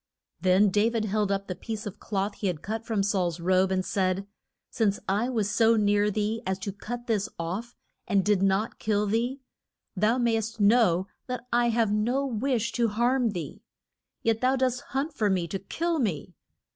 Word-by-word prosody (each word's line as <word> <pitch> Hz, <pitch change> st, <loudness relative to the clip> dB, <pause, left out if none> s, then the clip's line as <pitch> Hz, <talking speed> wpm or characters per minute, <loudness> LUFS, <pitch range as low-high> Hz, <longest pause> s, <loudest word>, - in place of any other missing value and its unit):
Then 185 Hz, +3 st, +4 dB
Da 210 Hz, +3 st, +3 dB
vid 230 Hz, -2 st, -1 dB
held 210 Hz, -1 st, 0 dB
up 195 Hz, 0 st, -1 dB
the 185 Hz, -, -2 dB
piece 215 Hz, +4 st, -6 dB
of 205 Hz, -, -7 dB
cloth 200 Hz, 0 st, -2 dB
he 200 Hz, -, -3 dB
had 170 Hz, -4 st, -3 dB
cut 225 Hz, +2 st, -4 dB
from 215 Hz, -4 st, +1 dB
Saul's 185 Hz, -5 st, 0 dB
robe, 185 Hz, +2 st, +3 dB
and 185 Hz, -1 st, 0 dB
said, 190 Hz, 0 st, 0 dB, 0.5 s
Since 205 Hz, -3 st, +1 dB
I 210 Hz, +6 st, +1 dB
was 220 Hz, -5 st, 0 dB
so 225 Hz, +1 st, +4 dB
near 205 Hz, 0 st, +3 dB
thee 215 Hz, +2 st, -1 dB
as 190 Hz, -2 st, -1 dB
to 200 Hz, -, -3 dB
cut 240 Hz, +4 st, -6 dB
this 220 Hz, -3 st, 0 dB
off 190 Hz, +9 st, -4 dB, 0.3 s
and 195 Hz, -2 st, +2 dB
did 205 Hz, -2 st, +3 dB
not 195 Hz, +3 st, +1 dB
kill 210 Hz, -1 st, +1 dB
thee, 235 Hz, +6 st, -1 dB, 0.5 s
thou 215 Hz, +5 st, +2 dB
may'st 225 Hz, -2 st, 0 dB
know 200 Hz, -4 st, +4 dB, 0.2 s
that 250 Hz, -1 st, -4 dB
I 240 Hz, 0 st, +3 dB
have 225 Hz, -2 st, +2 dB
no 240 Hz, +6 st, +1 dB
wish 235 Hz, -2 st, -1 dB
to 235 Hz, -1 st, +1 dB
harm 240 Hz, +3 st, +1 dB
thee. 170 Hz, -8 st, -6 dB, 0.6 s
Yet 225 Hz, -1 st, +1 dB
thou 255 Hz, +1 st, +3 dB
dost 255 Hz, -1 st, 0 dB
hunt 280 Hz, +4 st, -2 dB
for 215 Hz, -7 st, +1 dB
me 180 Hz, -3 st, 0 dB
to 195 Hz, -, -3 dB
kill 330 Hz, -, -2 dB
me. 185 Hz, -, -2 dB
210 Hz, 190 wpm, -27 LUFS, 195-235 Hz, 0.6 s, Then